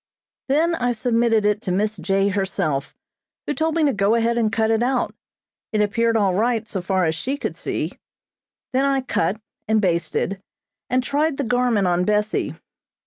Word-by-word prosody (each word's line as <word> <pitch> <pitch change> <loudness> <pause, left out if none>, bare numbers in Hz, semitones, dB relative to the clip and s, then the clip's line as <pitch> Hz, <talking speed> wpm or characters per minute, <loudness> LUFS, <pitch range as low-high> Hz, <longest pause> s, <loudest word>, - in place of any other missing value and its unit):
Then 320 +5 +3
I 245 -6 0
submitted 230 -2 +2
it 210 0 +2
to 190 - -3
Miss 210 +3 0
J. 195 +3 +1
herself, 185 -7 -2 0.5
who - - -1
told 320 +1 0
me 325 -2 +3
to 280 - +2
go 200 +1 +2
ahead 235 0 +1
and 225 -2 +1
cut 220 0 +1
it 225 0 +2
out. 250 +1 0 0.6
It 215 - 0
appeared 230 +2 +2
all 200 -3 +2
right, 225 +2 0
so 195 -3 -3
far 185 0 +1
as 160 - +1
she 260 - -3
could - - -4
see. - - -4 0.7
Then 260 +1 +2
I 275 -1 +2
cut, 200 -5 -1 0.3
and 220 0 +3
basted, 180 +1 -1 0.5
and 255 0 +2
tried 290 +2 0
the 285 - -1
garment 245 -4 +2
on 175 0 +2
Bessie. 210 +2 0
220 Hz, 180 wpm, -22 LUFS, 195-245 Hz, 0.7 s, Then